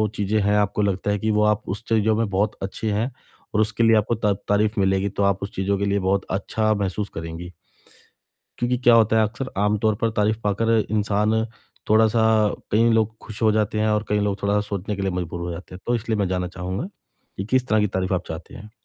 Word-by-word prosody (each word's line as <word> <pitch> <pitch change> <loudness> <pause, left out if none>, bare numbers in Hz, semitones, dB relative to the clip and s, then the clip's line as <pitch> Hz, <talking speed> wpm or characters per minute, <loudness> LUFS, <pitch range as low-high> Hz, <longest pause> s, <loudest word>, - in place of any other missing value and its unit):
चीज़ें 105 +1 0
हैं, 100 +1 +2
आपको 105 0 +1
लगता 100 0 0
है 105 - 0
कि 110 +2 0
वो 105 0 +2
आप 105 0 +2
उस 100 +4 -4
चीज़ों 110 -1 +3
में 115 -1 0
बहुत 100 +2 0
अच्छे 105 +3 -3
हैं। 110 +6 -1 0.4
और 105 - +3
उसके 110 +2 0
लिए 115 0 +5
आपको 110 +2 +1
ता 105 -2 +1
तारीफ़ 105 +1 +1
मिलेगी, 95 +1 +2
तो 100 - -2
आप 100 -1 +1
उस 100 - -5
चीज़ों 100 +1 0
के 100 - -1
लिए 100 0 +1
बहुत 95 +1 0
अच्छा 110 +3 0
महसूस 100 0 -2
करेंगी। 80 +1 -6 1.1
क्योंकि 120 +1 0
क्या 120 -1 +5
होता 110 -1 +4
है, - - +5
अक्सर 130 +4 -6
आमतौर 105 +1 +2
पर 115 - +2
तारीफ़ 105 +1 +2
पाकर 115 +3 +2
इंसान 105 +1 +1 0.5
थोड़ा-सा 110 +1 +4 0.5
कई 115 +3 +4
लोग 110 0 +1
खुश 110 -1 -9
हो 110 - +5
जाते 105 0 0
हैं 110 - +2
और 105 0 +1
कई 105 - +1
लोग 100 -1 -1
थोड़ा-सा 100 +1 +2
सोचने 100 +1 -3
के 100 - -4
लिए 95 - 0
मजबूर 90 -1 -4
हो 85 0 -3
जाते 90 +2 -9
हैं। 90 - -10
तो 120 - +1
इसलिए 115 -2 -1
मैं 100 -2 +1
जानना 90 -1 -1
चाहूँगा, 95 - -4 0.5
कि 95 - -3
किस 130 +4 +1
तरह 110 0 +3
की 105 - +2
तारीफ़ 95 0 -1
आप 90 0 -2
चाहते 80 +2 -8
हैं? 105 +1 -11
105 Hz, 230 wpm, -23 LUFS, 100-110 Hz, 1.1 s, लिए